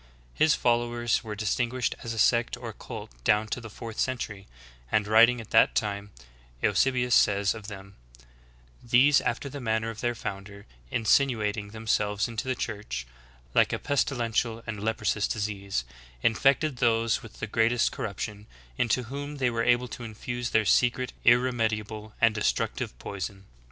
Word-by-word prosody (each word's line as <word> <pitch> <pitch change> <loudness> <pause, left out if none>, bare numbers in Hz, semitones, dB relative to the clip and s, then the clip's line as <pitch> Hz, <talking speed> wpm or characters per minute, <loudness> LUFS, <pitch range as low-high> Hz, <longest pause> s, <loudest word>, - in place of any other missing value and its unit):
His 155 0 +4
followers 120 0 +1
were 110 -2 -5
distinguished 115 +4 -1
as 115 - -5
a 115 - -5
sect 115 +2 +3
or - - -7
cult - - -8
down 105 - +3
to 125 - -3
the 110 - -9
fourth 115 +1 -8
century; 110 -6 -2 0.4
and, 105 -1 +2
writing 115 +3 +6
at 115 - -10
that - - +5
time, 100 -1 -1 0.5
Eusebius 125 +4 +2
says 100 -3 +4
of 110 -2 -9
them: 100 -2 -9 0.9
"These, 125 +4 +5
after 120 +4 -2
the 140 +1 -7
manner 110 -1 0
of 115 - -9
their 120 -1 0
founder, 100 -1 -7 0.2
insinuating 110 - +1
themselves 105 -2 0
into 115 +2 -4
the 130 - 0
Church, 100 - -4 0.5
like - - +4
a - - 0
pes 145 -2 +1
tilential 115 -2 -1
and 105 -3 -5
leprous 110 -1 0
disease, 100 - -2 0.4
infected 135 +4 +3
those 115 -2 +2
with 115 - -13
the - - -2
great 110 +2 +2
est 120 -1 +2
corruption, 105 +1 -5 0.3
into 125 +1 +2
whom 145 +4 -6
they 125 -3 +1
were 115 0 -1
able 120 +1 +3
to 125 - -7
infuse 120 +2 -4
their 110 -1 +2
secret, 125 +3 +2
irremediable, 110 -3 +1
and 115 -1 +4
destructive 105 - -1
poison. 95 - -6
115 Hz, 155 wpm, -27 LUFS, 105-120 Hz, 0.9 s, writing